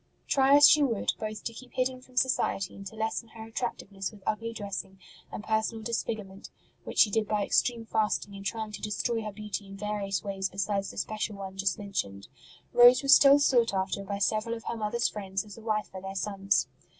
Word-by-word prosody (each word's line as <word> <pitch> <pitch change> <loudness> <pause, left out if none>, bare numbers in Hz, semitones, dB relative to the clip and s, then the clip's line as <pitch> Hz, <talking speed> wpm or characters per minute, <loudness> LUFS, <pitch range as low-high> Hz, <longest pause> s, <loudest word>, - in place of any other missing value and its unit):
Try 270 0 +5
as 290 0 +9
she 300 - +6
would, 235 -7 +1
both 215 -1 -5
to 230 - -4
keep 250 +2 -12
hidden 255 0 -1
from 255 0 -20
society 255 -7 +1
and 195 0 -8
to 220 - -10
lessen 220 +1 -2
her 220 - -8
attractiveness 205 -4 -4
with 205 -3 -16
ugly 230 +2 -2
dressing 200 -3 -6 0.3
and - - -6
personal 220 +1 -1
disfigurement 215 -4 -4 0.4
(which - - -7
she 210 - +6
did 220 0 +1
by 210 -1 0
extreme 235 -2 +1
fasting, 215 -2 0
and 195 - -8
trying 220 +1 -3
to 205 - -7
destroy 225 +2 -1
her 215 -1 -5
beauty 210 0 -6
in 195 0 -10
various 200 -2 -2
ways 195 -1 -2
besides 195 +1 -2
the - - -11
special 215 +1 -3
one 190 -1 -7
just 195 0 0
mentioned), 100 - -4 0.4
Rose 245 +2 +7
was 275 0 +8
still 280 0 +7
sought 245 -7 +3
after 190 +1 -1
by 200 +1 -4
several 215 +3 0
of 225 - -9
her - - -3
mother 215 +1 -2
s 235 - +3
friends 195 0 -4
as 205 - -11
a 230 - -12
wife 215 -1 -1
for 190 - -8
their 195 0 -6
sons. 195 0 0
210 Hz, 210 wpm, -29 LUFS, 195-230 Hz, 0.4 s, as